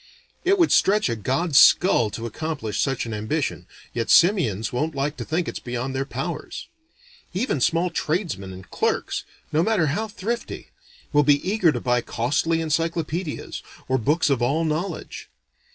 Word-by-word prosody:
It 385 +2 +3
would 340 -3 +3
stretch 210 -5 +3
a 115 - -1
god's 135 - +2
skull 125 - +5
to 115 +2 -6
accomplish 115 -4 -4
such 135 -3 -1
an 115 - -5
ambition, 105 - -2 0.3
yet 115 -1 -2
simians 135 - +3
won't 150 +5 -1
like 140 +2 -1
to - - -4
think 170 +2 -1
it's - - -4
beyond 125 +2 -4
their 135 +1 -1
powers. 150 - -5 0.7
Even 190 - 0
small 170 +4 +2
tradesmen 155 - -2
and 95 0 -11
clerks, - - -1 0.3
no 155 - +2
matter 200 -3 +2
how 220 +4 -2
thrifty, 220 +3 -5 0.4
will 145 - +6
be 145 +3 +3
eager 195 -5 +3
to 125 - -3
buy 125 0 +1
costly 150 +9 0
encyclopedias, 165 +1 -2 0.3
or 130 0 +1
books 150 +6 +2
of 130 -3 +1
all 145 +7 +1
knowledge. 160 +3 -4
150 Hz, 160 wpm, -23 LUFS, 120-175 Hz, 0.7 s, will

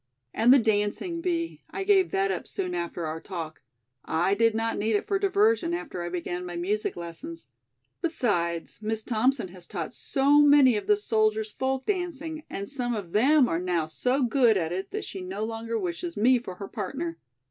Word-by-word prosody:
"And 230 +3 +4
the 270 - +9
dancing, 220 - 0
Bee, 335 -2 -2
I 390 - -4
gave 385 -2 +4
that 195 0 +1
up 185 - -4
soon 185 -2 -3
after 170 -1 -3
our 160 +1 -4
talk. 165 -5 -6 0.4
I 170 +4 +1
did 225 +1 +3
not 225 -1 -1
need 215 +1 +1
it 205 - 0
for 395 -1 0
diversion 395 -2 +2
after 185 - -5
I 175 - -3
began 175 0 -4
my 175 -1 -6
music 200 +5 -1
lessons. 175 - -8 0.5
Besides, 190 - -1
Miss 220 0 -2
Thompson 240 -2 +1
has 175 -1 -12
taught 170 -6 -5
so 280 +2 +3
many 285 -4 +6
of 210 - -3
the 420 - +5
soldiers 215 - +1
folk 265 +2 -2
dancing 325 -5 -3
and 200 +1 -5
some 245 -4 -2
of 195 -6 -6
them 265 - +5
are 165 - 0
now 175 -3 0
so 250 - 0
good 240 -3 +4
at 165 -3 -1
it 185 +2 -3
that 420 0 -4
she 190 - -7
no 190 +4 -4
longer 225 0 -3
wishes 345 +1 -4
me 250 +4 +4
for 185 -6 -8
her 200 +2 -7
partner." 330 +10 -4
225 Hz, 190 wpm, -27 LUFS, 185-295 Hz, 0.5 s, the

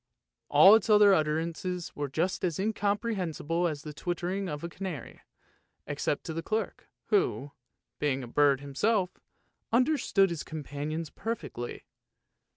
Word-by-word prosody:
" - - -61
All 195 - +8
its 225 +1 +4
other 210 -1 +7
utterances 165 +2 -1
were 145 0 -2
just 170 +9 -1
as 170 -4 0
incomprehensible 195 -5 -1
as 150 -3 -4
the 150 - -7
twittering 180 +4 -3
of 150 -1 -4
the 170 - -4
canary, 180 -7 -7 0.6
except - - -2
to 160 - -5
the 165 - -3
clerk, 220 +6 -3 0.2
who, 390 - +1 0.5
being 135 -3 0
a - - -7
bird 140 +1 +3
himself, 180 +8 0 0.5
under 255 +6 +3
stood 195 -2 +3
his 170 - -3
companions 155 +1 -5
perfectly. 205 - -5
170 Hz, 140 wpm, -29 LUFS, 150-200 Hz, 0.6 s, All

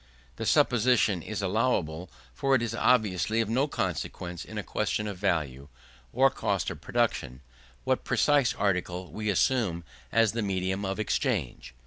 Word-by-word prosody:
This - - -1
supposition 115 -6 +3
is 105 +3 -5
allowable, 90 -6 0 0.2
for 135 - +2
it 120 - +1
is 115 - -2
obviously 110 -3 +2
of 115 -2 0
no 130 +6 +2
consequence, 90 - -4
in - - -9
a - - -2
question 105 - -1
of 100 -3 -5
value, 70 -8 -1 0.4
or - - +4
cost - - -1
of - - -9
production, 65 -2 -1 0.4
what - - 0
precise 145 -4 +2
article 90 -2 -1
we 105 0 -3
assume 100 -4 +1 0.3
as 115 -2 +3
the 115 - -2
medium 95 0 -1
of 95 +2 -3
exchange. 65 - -2
100 Hz, 150 wpm, -28 LUFS, 90-115 Hz, 0.4 s, or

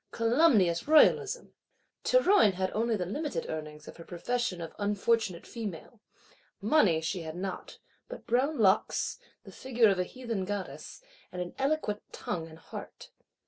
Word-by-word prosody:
Calumnious 230 - +3
Royalism! 420 +9 +4 0.5
Théroigne 400 - +5
had 185 0 -1
only 225 +1 0
the 185 -4 -2
limited 290 - -3
earnings 155 -1 -7
of - - -10
her 165 - -10
profession 215 +3 -2
of 165 -1 -7
unfortunate 205 -2 0
female; 215 -1 -7 0.6
money 205 - +3
she 170 +3 -3
had 160 0 -7
not, 190 +1 -6 0.3
but - - -9
brown 270 +6 +1
locks, 205 -1 +2 0.2
the - - -12
figure 240 -4 +2
of 195 -2 +1
a - - +2
heathen 235 -1 -4
Goddess, 205 - -6 0.3
and 180 - -6
an 180 0 -4
eloquent 270 -7 0
tongue 165 -2 -4
and 160 0 -13
heart. 160 - -10
205 Hz, 145 wpm, -30 LUFS, 180-245 Hz, 0.6 s, Théroigne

